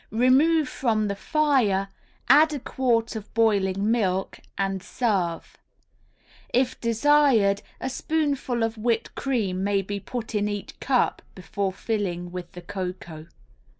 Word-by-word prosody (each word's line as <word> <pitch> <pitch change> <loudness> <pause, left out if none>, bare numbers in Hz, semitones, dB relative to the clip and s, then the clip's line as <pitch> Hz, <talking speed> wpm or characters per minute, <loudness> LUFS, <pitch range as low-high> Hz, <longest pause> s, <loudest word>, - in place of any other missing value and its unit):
Remove 270 +7 +3
from 220 -5 0
the 200 - -2
fire, 250 -8 +1 0.4
add 300 +4 +6
a 290 - -3
quart 240 -3 0
of 215 -2 -7
boiling 205 -2 +2
milk, 195 -5 0 0.2
and 195 -1 -1
serve. 190 -8 -2 0.9
If 255 +1 0
desired 230 -4 +3 0.2
a - - -3
spoonful 280 -4 -1
of 225 0 -2
whipped 230 0 -1
cream 205 -9 -1
may 200 -1 +1
be 200 +1 -4
put 230 +3 -6
in 210 -1 +1
each 205 -1 -6
cup 255 -2 +1
before 190 +2 -3
filling 185 -4 -3
with 180 -1 -7
the 180 - -10
cocoa. 180 -4 -6
220 Hz, 130 wpm, -25 LUFS, 195-255 Hz, 0.9 s, add